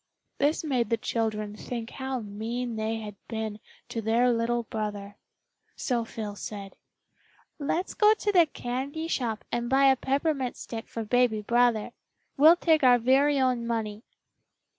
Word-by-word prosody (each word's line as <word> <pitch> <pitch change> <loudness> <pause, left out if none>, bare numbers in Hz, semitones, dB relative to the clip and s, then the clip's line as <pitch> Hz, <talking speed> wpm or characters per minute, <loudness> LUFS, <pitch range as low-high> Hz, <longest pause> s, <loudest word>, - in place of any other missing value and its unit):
This 290 +4 +2
made 255 -7 0
the 230 - +2
children 215 -2 -2
think 230 +1 -6
how 265 -2 -4
mean 225 +3 -4
they 220 +1 -1
had 210 -2 -7
been 220 -2 -4 0.3
to 230 - -3
their 235 +3 +3
little 235 +1 0
brother. 205 -2 -5 0.6
So 240 -3 -1
Phil 215 -3 -6
said, 200 -1 -7 0.8
"Let's 330 +6 -1
go 430 0 +5
to 420 -1 -1
the 350 -4 +5
candy 280 +5 -4
shop 235 -8 -2
and 240 0 -1
buy 270 +1 +5
a - - +3
peppermint 270 0 -1
stick 225 -1 -7
for 230 - -5
baby 230 -1 +2
brother. 240 -1 +2 0.4
We'll 310 +4 +7
take 320 -4 +2
our 250 -1 +7
very 270 +4 +3
own 250 -3 +1
money." 220 -2 -2
240 Hz, 150 wpm, -27 LUFS, 220-265 Hz, 0.8 s, We'll